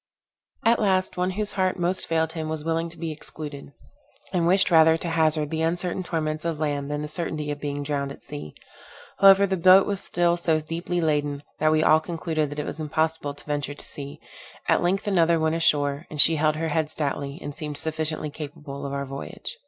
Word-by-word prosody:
At 230 Hz, +1 st, +4 dB
last, 190 Hz, -3 st, +1 dB
one 180 Hz, +1 st, 0 dB
whose 210 Hz, -1 st, 0 dB
heart 185 Hz, -1 st, 0 dB
most 180 Hz, +2 st, 0 dB
failed 160 Hz, -1 st, +1 dB
him 160 Hz, -2 st, -4 dB
was 155 Hz, -1 st, -3 dB
willing 165 Hz, +1 st, -1 dB
to 165 Hz, -, -11 dB
be 165 Hz, -1 st, -4 dB
excluded, 150 Hz, -2 st, -8 dB, 0.6 s
and 170 Hz, -2 st, +2 dB
wished 185 Hz, +1 st, +4 dB
rather 160 Hz, -1 st, +6 dB
to 170 Hz, -, -4 dB
hazard 155 Hz, -2 st, +1 dB
the 160 Hz, 0 st, -1 dB
uncertain 175 Hz, +3 st, -1 dB
torments 155 Hz, -3 st, -2 dB
of 165 Hz, -2 st, -2 dB
land, 145 Hz, -2 st, -1 dB
than 150 Hz, 0 st, -2 dB
the -, -, -3 dB
certainty 155 Hz, -2 st, -3 dB
of 145 Hz, -, -5 dB
being 145 Hz, 0 st, -3 dB
drowned 140 Hz, -1 st, -2 dB
at 120 Hz, -, -12 dB
sea. 75 Hz, -9 st, -8 dB, 0.6 s
However 195 Hz, 0 st, +8 dB
the 190 Hz, -1 st, -1 dB
boat 185 Hz, +2 st, +7 dB
was 200 Hz, -2 st, -2 dB
still 175 Hz, 0 st, +1 dB
so 165 Hz, -2 st, +1 dB
deeply 170 Hz, +3 st, -3 dB
laden, 145 Hz, -2 st, 0 dB, 0.2 s
that 155 Hz, 0 st, +3 dB
we 155 Hz, 0 st, +3 dB
all 155 Hz, -, +6 dB
concluded 160 Hz, -2 st, -2 dB
that 145 Hz, -, -7 dB
it 150 Hz, -, -2 dB
was -, -, -4 dB
impossible 155 Hz, -1 st, -1 dB
to 145 Hz, -, -14 dB
venture 145 Hz, -1 st, -3 dB
to -, -, -8 dB
sea. 140 Hz, 0 st, -8 dB, 0.5 s
At -, -, +3 dB
length 185 Hz, +3 st, 0 dB
another 170 Hz, -4 st, +3 dB
went 160 Hz, 0 st, +1 dB
ashore, 145 Hz, -2 st, +1 dB
and 150 Hz, -, -7 dB
she 160 Hz, +2 st, +6 dB
held 155 Hz, 0 st, +2 dB
her 160 Hz, +1 st, -2 dB
head 155 Hz, 0 st, 0 dB
stoutly, 140 Hz, -2 st, -3 dB
and 145 Hz, -, -6 dB
seemed 150 Hz, 0 st, -6 dB
sufficiently 155 Hz, -1 st, -3 dB
capable 145 Hz, -2 st, -7 dB
of 140 Hz, -, -5 dB
our 140 Hz, 0 st, -2 dB
voyage. 135 Hz, +1 st, -7 dB
155 Hz, 210 wpm, -25 LUFS, 145-170 Hz, 0.6 s, However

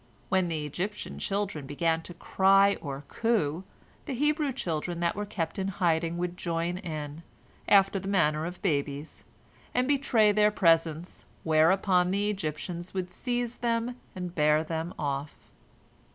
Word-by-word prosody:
When 190 Hz, -1 st, +2 dB
the 155 Hz, -3 st, -2 dB
Egyptian 180 Hz, +8 st, -4 dB
children 195 Hz, -8 st, -2 dB
began 165 Hz, +3 st, 0 dB
to 175 Hz, +1 st, -9 dB
cry 195 Hz, +3 st, +4 dB
or 140 Hz, -1 st, -5 dB
coo, 185 Hz, -8 st, 0 dB, 0.4 s
the 275 Hz, -, -3 dB
Hebrew 295 Hz, +2 st, +1 dB
children 170 Hz, -, -3 dB
that 170 Hz, 0 st, +1 dB
were 205 Hz, 0 st, -4 dB
kept 175 Hz, -4 st, -3 dB
in 190 Hz, -, -1 dB
hiding 170 Hz, -3 st, 0 dB
would 180 Hz, 0 st, -3 dB
join 170 Hz, +1 st, -2 dB
in, 155 Hz, -3 st, -6 dB, 0.5 s
after 195 Hz, 0 st, +5 dB
the 195 Hz, -, -7 dB
manner 160 Hz, -5 st, +2 dB
of 180 Hz, +4 st, -9 dB
babies, 145 Hz, -3 st, -2 dB, 0.5 s
and 250 Hz, +1 st, +2 dB
betray 260 Hz, -7 st, +3 dB
their 210 Hz, 0 st, +4 dB
presence, 165 Hz, -4 st, +1 dB, 0.2 s
whereupon 180 Hz, +3 st, +3 dB
the 200 Hz, +2 st, +1 dB
Egyptians 175 Hz, 0 st, -5 dB
would 180 Hz, -1 st, -3 dB
seize 245 Hz, -1 st, -2 dB
them 235 Hz, 0 st, -1 dB, 0.2 s
and 180 Hz, -2 st, -5 dB
bear 150 Hz, -1 st, +3 dB
them 165 Hz, +1 st, -3 dB
off. 145 Hz, 0 st, -3 dB
180 Hz, 145 wpm, -28 LUFS, 160-205 Hz, 0.5 s, after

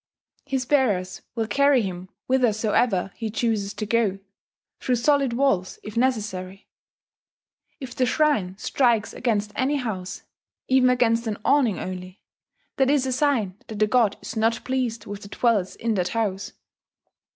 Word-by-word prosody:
His 265 Hz, -2 st, -1 dB
bearers 210 Hz, -10 st, +1 dB
will 225 Hz, -2 st, 0 dB
carry 275 Hz, +3 st, +3 dB
him 185 Hz, -1 st, -6 dB, 0.2 s
whithersoever 220 Hz, -5 st, +1 dB
he 225 Hz, -2 st, -4 dB
chooses 215 Hz, -2 st, -1 dB
to 215 Hz, -, -3 dB
go 215 Hz, -3 st, +1 dB, 0.6 s
through 255 Hz, -, 0 dB
solid 275 Hz, +1 st, +2 dB
walls 235 Hz, -8 st, +1 dB
if 210 Hz, -, -8 dB
necessary. 205 Hz, -6 st, -2 dB, 1.1 s
If 265 Hz, -3 st, -7 dB
the 255 Hz, -, +1 dB
shrine 230 Hz, -11 st, +1 dB
strikes 235 Hz, -1 st, +1 dB
against 215 Hz, -4 st, -1 dB
any 270 Hz, +3 st, +1 dB
house, 210 Hz, -9 st, -4 dB, 0.4 s
even 260 Hz, -1 st, +4 dB
against 235 Hz, -2 st, +2 dB
an 210 Hz, -2 st, -2 dB
awning 265 Hz, -8 st, +3 dB
only, 185 Hz, +1 st, -7 dB, 0.6 s
that 265 Hz, -1 st, +3 dB
is 280 Hz, -2 st, +2 dB
a 260 Hz, -, -1 dB
sign 250 Hz, -8 st, +1 dB
that 220 Hz, -, -7 dB
the 215 Hz, -, +4 dB
god 215 Hz, -2 st, +2 dB
is -, -, -6 dB
not 225 Hz, +1 st, +1 dB
pleased 245 Hz, -4 st, -2 dB
with 205 Hz, 0 st, -7 dB
the -, -, -10 dB
dwellers 215 Hz, -5 st, +1 dB
in 230 Hz, -1 st, -1 dB
that 180 Hz, -3 st, 0 dB
house. 200 Hz, -2 st, -2 dB
225 Hz, 150 wpm, -24 LUFS, 200-255 Hz, 1.1 s, even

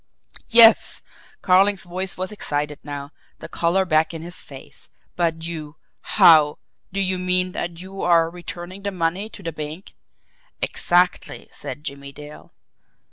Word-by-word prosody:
"Yes!" 230 Hz, -1 st, +7 dB, 0.4 s
Carling's 195 Hz, +2 st, +3 dB
voice 185 Hz, +1 st, -3 dB
was 185 Hz, +1 st, -4 dB
excited 150 Hz, -7 st, -3 dB
now, 145 Hz, 0 st, -7 dB, 0.3 s
the -, -, -9 dB
colour 180 Hz, +3 st, +1 dB
back 160 Hz, -1 st, +1 dB
in 160 Hz, -, -7 dB
his 175 Hz, +1 st, -6 dB
face. 135 Hz, -2 st, -11 dB, 0.3 s
"But 165 Hz, -2 st, -1 dB
you 160 Hz, -2 st, -6 dB, 0.4 s
how 155 Hz, -3 st, +6 dB, 0.3 s
do 195 Hz, -, -3 dB
you 185 Hz, -1 st, 0 dB
mean 180 Hz, 0 st, 0 dB
that 170 Hz, -1 st, -5 dB
you 190 Hz, +1 st, -8 dB
are 170 Hz, -2 st, +3 dB
returning 175 Hz, +2 st, -9 dB
the 200 Hz, -, -2 dB
money 185 Hz, +3 st, -2 dB
to 205 Hz, -, -13 dB
the 165 Hz, -, -3 dB
bank?" 155 Hz, +5 st, -8 dB, 0.7 s
"Exactly," 180 Hz, +1 st, 0 dB
said 145 Hz, 0 st, -8 dB
Jimmie 140 Hz, -2 st, -8 dB
Dale. 150 Hz, +1 st, -12 dB
175 Hz, 140 wpm, -22 LUFS, 155-185 Hz, 0.7 s, Yes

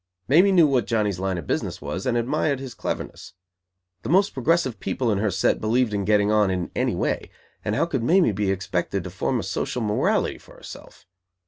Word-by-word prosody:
Mamie 175 Hz, +9 st, +5 dB
knew 175 Hz, -4 st, +6 dB
what 130 Hz, -7 st, +1 dB
Johnny's 105 Hz, -5 st, 0 dB
line 95 Hz, -1 st, -1 dB
of 85 Hz, -, -6 dB
business -, -, -2 dB
was, 95 Hz, +6 st, -5 dB
and 120 Hz, -1 st, +1 dB
admired 140 Hz, +3 st, 0 dB
his 130 Hz, -3 st, -7 dB
cleverness. -, -, -6 dB, 0.7 s
The -, -, -6 dB
most 195 Hz, +5 st, +3 dB
progressive 135 Hz, -2 st, 0 dB
people 120 Hz, -4 st, -1 dB
in 100 Hz, -, 0 dB
her 105 Hz, 0 st, +1 dB
set 95 Hz, +1 st, +1 dB
believed 115 Hz, +1 st, +1 dB
in 100 Hz, -1 st, -1 dB
"getting 105 Hz, 0 st, +3 dB
on" 105 Hz, -2 st, +3 dB
in 90 Hz, -2 st, -2 dB
any -, -, 0 dB
way, -, -, -2 dB, 0.3 s
and 105 Hz, -, -1 dB
how -, -, +2 dB
could 140 Hz, -7 st, -2 dB
Mamie 170 Hz, -, +3 dB
be 100 Hz, 0 st, -1 dB
expected 95 Hz, 0 st, -2 dB
to 90 Hz, -, -7 dB
form 120 Hz, +7 st, -1 dB
a -, -, -4 dB
social 105 Hz, +5 st, -3 dB
morality 105 Hz, -1 st, 0 dB
for -, -, -17 dB
herself? -, -, -12 dB
110 Hz, 205 wpm, -24 LUFS, 100-135 Hz, 0.7 s, knew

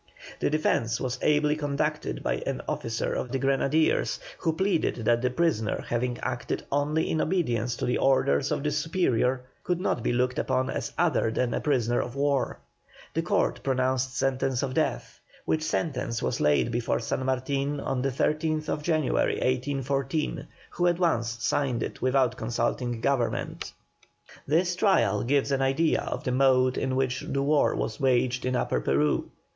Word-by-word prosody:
The -, -, +1 dB
defence 120 Hz, -6 st, +1 dB
was 125 Hz, -1 st, -3 dB
ably 150 Hz, 0 st, +3 dB
conducted 150 Hz, +1 st, -2 dB
by -, -, 0 dB
an -, -, -2 dB
officer 115 Hz, 0 st, -2 dB
of 125 Hz, -, -3 dB
the 135 Hz, -, 0 dB
Grenadiers, 135 Hz, +3 st, +1 dB, 0.2 s
who 165 Hz, -, +1 dB
pleaded 165 Hz, -, 0 dB
that 120 Hz, +1 st, +3 dB
the 125 Hz, -, +1 dB
prisoner 125 Hz, -7 st, 0 dB
having 120 Hz, +1 st, -1 dB
acted -, -, -3 dB
only 145 Hz, +3 st, +1 dB
in 160 Hz, -, 0 dB
obedience 125 Hz, -, 0 dB
to -, -, -3 dB
the 125 Hz, -, 0 dB
orders 130 Hz, -, +2 dB
of -, -, -1 dB
his 150 Hz, 0 st, 0 dB
superior 130 Hz, -6 st, +1 dB, 0.2 s
could 180 Hz, -1 st, -1 dB
not 180 Hz, -9 st, 0 dB
be 120 Hz, -, 0 dB
looked 125 Hz, +1 st, 0 dB
upon 130 Hz, 0 st, 0 dB
as -, -, -3 dB
other 165 Hz, -9 st, +2 dB
than 120 Hz, +1 st, 0 dB
a -, -, -1 dB
prisoner 120 Hz, -5 st, +1 dB
of 120 Hz, -, -6 dB
war. 140 Hz, -1 st, 0 dB, 0.6 s
The -, -, 0 dB
Court -, -, 0 dB
pronounced 130 Hz, -1 st, 0 dB
sentence 130 Hz, 0 st, 0 dB
of 130 Hz, -2 st, -2 dB
death, -, -, -1 dB, 0.3 s
which 155 Hz, -, +1 dB
sentence 130 Hz, -7 st, -2 dB
was -, -, -1 dB
laid 75 Hz, +10 st, +3 dB
before 120 Hz, 0 st, 0 dB
San 120 Hz, +2 st, -2 dB
Martin 135 Hz, +2 st, -1 dB
on 135 Hz, -2 st, -2 dB
the 135 Hz, -, +1 dB
13th 155 Hz, +3 st, -1 dB
January, 155 Hz, -2 st, +1 dB
1814, 135 Hz, +3 st, -1 dB, 0.2 s
who 175 Hz, -, +1 dB
at 175 Hz, -1 st, +2 dB
once 120 Hz, -10 st, 0 dB
signed 135 Hz, -5 st, 0 dB
it -, -, -6 dB
without 130 Hz, -1 st, +2 dB
consulting 120 Hz, +1 st, -2 dB
Government. 130 Hz, -3 st, -1 dB, 0.8 s
This 175 Hz, +4 st, +2 dB
trial 115 Hz, -, +3 dB
gives 140 Hz, +2 st, +1 dB
an 135 Hz, -1 st, +1 dB
idea 135 Hz, +5 st, +2 dB
of -, -, -4 dB
the 125 Hz, -, -1 dB
mode 130 Hz, -1 st, +3 dB
in 130 Hz, -, -1 dB
which 130 Hz, -1 st, 0 dB
war 140 Hz, +2 st, +1 dB
was -, -, -3 dB
waged 125 Hz, -2 st, +1 dB
in 130 Hz, 0 st, 0 dB
Upper -, -, 0 dB
Peru. 75 Hz, +2 st, +1 dB
130 Hz, 165 wpm, -27 LUFS, 125-150 Hz, 0.8 s, ably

